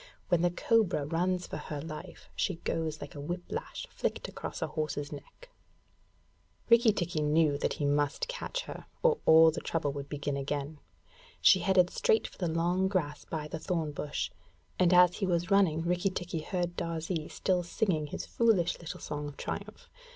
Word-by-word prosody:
When 175 -2 +3
the 175 - +4
cobra 185 -4 +2
runs 180 +4 0
for - - -6
her 150 - -5
life, 160 +4 -8
she 190 - 0
goes 160 -2 -3
like 145 - -7
a 145 - -7
whip 175 +4 -4
lash - - -5
flicked - - -2
across - - -5
a - - +2
horse's 145 -2 -3
neck. - - -11 1.2
Rikki 235 -1 +7
tikki 175 -5 -2
knew 150 0 +3
that - - 0
he 145 - -2
must 145 0 +1
catch - - -3
her, - - -9 0.2
or 470 -2 +4
all 160 0 +8
the 165 - -5
trouble 160 -4 -1
would 140 0 -6
begin 145 -1 -2
again. 145 +2 -3 0.6
She - - +6
headed 185 -2 +3
straight 220 - +2
for - - -17
the 180 - 0
long 175 +3 +1
grass 160 -7 -2
by 155 -2 -4
the 160 - -5
thorn 165 -3 -1
bush, 145 0 -3 0.5
and 180 -1 +5
as 180 -1 +6
he 195 - -1
was 175 +1 0
running 175 -5 +4
Rikki 180 +3 +1
tikki 175 -3 -4
heard 175 +1 -2
Darzee 165 -1 -3
still 185 -2 0
singing 170 -3 0
his - - -5
foolish 220 -7 +2
little 165 - -7
song 150 0 -4
of 145 - -9
triumph. - - -6
165 Hz, 180 wpm, -30 LUFS, 150-185 Hz, 1.2 s, all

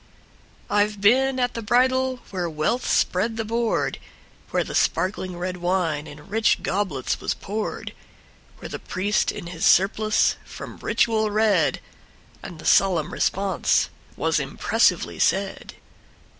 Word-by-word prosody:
I 205 0 +3
've 210 -1 -10
been 260 +6 +3
at 245 -1 0
the 230 - -4
bridal 255 +3 +2
where 180 -3 -2
wealth 155 +11 -1
spread 220 +5 +1
the 225 - -2
board, 230 +1 -1 0.5
Where - - +1
the - - -8
sparkling 185 -1 0
red 180 +1 -3
wine 175 -4 -1
in 150 0 -12
rich 220 +2 +1
goblets 185 -10 -1
was - - -1
poured; 210 +2 -5 0.6
Where - - -8
the - - -6
priest 205 +3 0
in 205 - -8
his 170 -1 -6
surplice 215 +3 +3
from - - -9
ritual 220 -2 +1
read, 205 -6 +2 0.6
And 170 - -9
the 160 - -12
solemn 180 -6 +3
response 195 0 +1 0.3
was - - +1
impressively - - +1
said. - - 0
205 Hz, 135 wpm, -24 LUFS, 180-225 Hz, 0.6 s, I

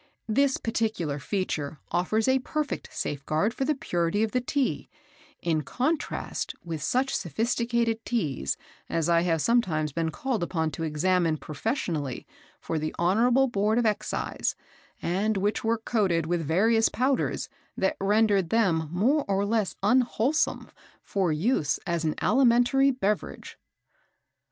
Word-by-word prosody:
This 265 +5 +2
particular 220 -10 -2
feature 155 -3 -3
offers 215 +6 +1
a 260 0 +4
perfect 300 +3 -3
safeguard 155 +9 -1
for 270 - -2
the 305 - +1
purity 175 -3 0
of 220 - -1
the 250 - +1
Tea, 270 +2 -1 0.5
in 160 -2 +1
contrast 290 - -2
with 165 -3 -5
such 260 - 0
sophisticated 230 - 0
Teas 145 - -1 0.3
as 165 -1 0
I 170 0 +4
have 165 -3 +1
sometimes 165 -11 +1
been 165 0 0
called 240 +5 -2
upon 160 -2 -1
to 150 - -7
examine 165 +1 +1
professionally 155 - -3 0.3
for 160 - -3
the 155 0 -3
Honourable 235 +9 +3
Board 215 -1 +1
of 240 - +2
Excise, 215 -2 -1 0.5
and 200 +5 0
which 205 +2 0
were 230 +1 +1
coated 195 -8 0
with 175 +1 0
various 220 +9 +3
powders 260 +2 0 0.3
that 190 - +1
rendered 200 -3 +3
them 170 -9 +2
more 255 - +2
or 200 0 +1
less 215 -2 0
unwholesome 250 +5 +1 0.3
for 190 -4 0
use 155 - +1
as 170 -3 -1
an 155 - 0
alimentary 250 +3 +4
beverage." 215 -6 -2
205 Hz, 135 wpm, -27 LUFS, 165-235 Hz, 0.5 s, a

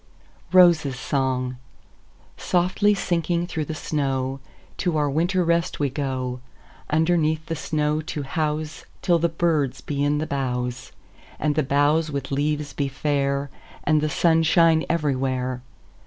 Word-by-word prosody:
ROSES' 170 -7 +5
SONG"SOFTLY 135 - -2
sinking 175 -2 0
through 160 -3 -3
the 155 - -5
snow, 135 -3 -2 0.4
To 175 -4 0
our 150 -1 +2
winter 175 +6 +1
rest 170 0 0
we 140 -3 0
go, 130 -2 -3 0.5
Underneath 160 0 +1
the 165 - -3
snow 150 0 -1
to 150 -1 -5
houseTill 155 +3 -2
the 170 - +2
birds 155 -5 0
be 140 -1 -2
in 145 +1 +2
the 155 - -1
boughs, 125 -3 -3 0.5
And 150 -1 0
the 155 - +1
boughs 145 +3 +2
with 140 -2 -4
leaves 145 +1 -1
be 140 - -1
fair, 140 0 -1 0.3
And 155 -1 +3
the 155 - 0
sun 165 +1 +3
shine 165 0 +4
everywhere. 130 -5 -1
150 Hz, 130 wpm, -23 LUFS, 135-165 Hz, 0.5 s, ROSES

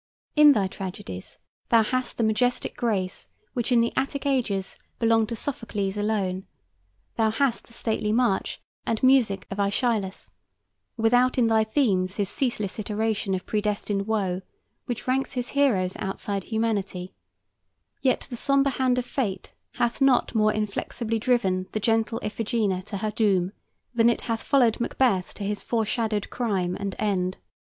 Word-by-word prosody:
In 300 -1 +8
thy 205 -6 +1
tragedies 185 - -7 0.3
thou 230 -1 +6
hast 255 +3 -1
the 230 - +1
majestic 245 +3 +1
grace 200 -6 -2 0.3
which 245 0 -1
in 240 -1 +5
the 235 - 0
Attic 280 +1 -1
ages 230 -9 0 0.2
belonged 225 -1 +3
to 230 - -2
Sophocles 210 -6 -2
alone; 200 -3 -1 0.7
thou 220 -1 +3
hast 245 +2 0
the 235 - -17
stately 220 -2 -1
march 230 -3 +1 0.2
and 225 +1 -2
music 255 -7 +4
of 195 - -4
Aeschylus, 200 -1 0 0.7
without 245 +3 +3
in 245 - +4
thy 220 -1 +4
themes 205 -6 +1
his 200 -2 -1
ceaseless 225 -7 -2
iteration 210 -1 -1
of 185 - -5
predestined 210 -1 -1
woe 195 -4 0 0.5
which 245 0 -4
ranks 265 +1 0
his 245 -2 -3
heroes 215 -11 +2
outside 195 0 -3
humanity; 205 -5 -2 0.9
yet 260 - +1
the 240 - -4
sombre 275 +2 +3
hand 255 -1 +1
of 250 - 0
fate 205 -9 -3 0.2
hath 240 +3 0
not 270 -2 +4
more 215 -1 +3
inflexibly 215 +2 -2
driven 195 -6 +1
the 215 - 0
gentle 225 +1 +1
Iphigenia 210 -3 -1
to 200 - -4
her 215 +2 -2
doom 195 -5 +2 0.4
than 235 -1 +5
it 235 - 0
hath 230 -1 -2
followed 250 -6 +3
Macbeth 235 -6 +1
to 205 - -6
his 205 +1 -2
foreshadowed 220 -2 -1
crime 190 -7 -1
and 200 -2 -3
end. 185 -3 0
220 Hz, 150 wpm, -26 LUFS, 200-240 Hz, 0.9 s, In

